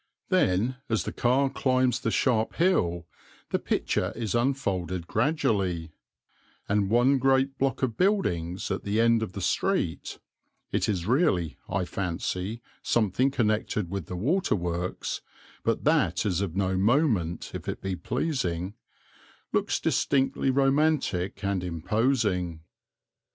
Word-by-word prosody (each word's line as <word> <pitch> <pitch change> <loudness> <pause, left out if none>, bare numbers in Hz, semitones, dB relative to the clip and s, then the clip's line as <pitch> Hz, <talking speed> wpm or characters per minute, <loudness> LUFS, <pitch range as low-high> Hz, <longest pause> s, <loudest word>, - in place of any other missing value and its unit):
Then 105 +8 +2
as 110 -1 +1
the - - -4
car 130 +3 +2
climbs 130 -2 +1
the 115 - -1
sharp 115 -1 +1
hill, 85 - +1 0.5
the - - +1
picture - - -1
is 110 -3 -3
unfolded 100 - -1
gradually, 105 - 0 0.8
and 100 -1 +1
one 125 +5 +4
great 135 +1 +2
block 135 0 0
of 115 -4 0
buildings 95 - 0
at - - -1
the 105 +2 0
end 115 0 +4
of 110 -4 -4
the 100 - -5
street 90 - -1 0.5
(it - - 0
is 90 -5 -1
really, 95 - +2
I 90 0 0
fancy, 90 +5 -3 0.2
something 120 +4 +2
connected 110 -7 0
with 95 -5 -4
the 90 - -5
waterworks, 90 - -1 0.4
but - - 0
that - - +2
is 95 -3 +1
of 95 -4 -3
no 95 -1 +1
moment 105 - +1
if - - -5
it - - -4
be 95 -1 -3
pleasing) 100 - -2 0.8
looks - - +1
distinctly 135 0 +1
romantic 135 - +1
and 100 -2 0
imposing. 90 - 0
105 Hz, 130 wpm, -27 LUFS, 90-130 Hz, 0.8 s, one